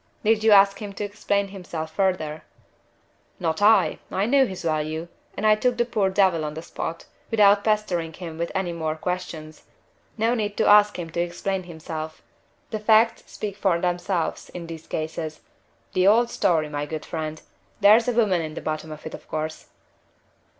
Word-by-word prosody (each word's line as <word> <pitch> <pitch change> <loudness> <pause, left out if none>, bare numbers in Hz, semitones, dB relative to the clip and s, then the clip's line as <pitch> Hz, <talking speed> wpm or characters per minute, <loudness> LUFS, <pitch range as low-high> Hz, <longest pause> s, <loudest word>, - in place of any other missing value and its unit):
"Did 220 0 +3
you 220 - +5
ask 200 -1 +6
him 205 -1 -6
to 205 - -5
explain 200 -1 -1
himself 170 -5 -6
further?" 160 -5 0 1.0
"Not 165 0 -1
I! 210 -2 +4
I 195 - 0
knew 265 +2 +4
his 185 -3 -7
value, 155 +1 -2 0.3
and 215 - -2
I 215 - +7
took 240 +3 +1
the 240 - +2
poor 210 -5 +1
devil 190 -4 +2
on 150 0 -4
the 160 - -6
spot, 165 -1 -5 0.2
without 205 -2 +5
pestering 195 -7 0
him 165 -2 -8
with 170 - -2
any 185 -3 -1
more 160 -2 -2
questions. 165 -2 -5 0.6
No 225 +2 +2
need 210 -3 -2
to - - +2
ask 210 0 +6
him 165 -2 -6
to 170 - -3
explain 185 +2 -2
himself. 160 -2 -7 0.5
The 215 - -2
facts 220 +2 +3
speak 205 -2 -5
for 190 -4 +1
themselves 175 0 -2
in 175 -1 -5
these 165 -1 -9
cases. 155 0 -4 0.5
The 185 +1 +3
old 235 +3 +4
story, 165 -6 +1
my 145 0 -4
good 155 0 -5
friend! 155 -1 -4 0.4
There's 215 +3 +6
a 245 - +1
woman 205 -7 +2
at 155 -1 -6
the - - -5
bottom 155 0 -4
of 155 0 -10
it, 160 - -6
of - - -10
course." 155 0 -4
180 Hz, 180 wpm, -24 LUFS, 160-210 Hz, 1.0 s, I